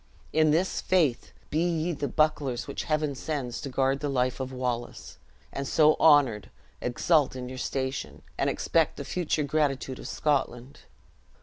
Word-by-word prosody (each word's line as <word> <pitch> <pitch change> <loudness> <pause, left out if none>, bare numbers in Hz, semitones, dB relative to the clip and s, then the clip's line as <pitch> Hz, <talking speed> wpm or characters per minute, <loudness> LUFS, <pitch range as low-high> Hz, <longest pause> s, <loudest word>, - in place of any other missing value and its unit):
In 155 0 +4
this 170 +5 +1
faith, 160 -10 +1 0.2
be 155 - +1
ye 170 -1 0
the 145 -3 -3
bucklers 150 -5 0
which 140 - -4
Heaven 155 -2 0
sends 135 -3 -4
to 140 - -5
guard 135 +1 +1
the 145 - -2
life 130 -1 0
of 130 0 -4
Wallace; 125 -2 -4 0.3
and, 140 0 -3
so 155 +1 +4
honored, 140 -9 +4 0.3
exult 145 +3 +2
in 125 -1 -5
your 130 0 -7
station, 130 0 -3
and - - 0
expect - - +1
the - - -6
future 165 -4 -1
gratitude 140 -3 -1
of - - -7
Scotland." 135 -3 -1
140 Hz, 160 wpm, -27 LUFS, 130-155 Hz, 0.3 s, In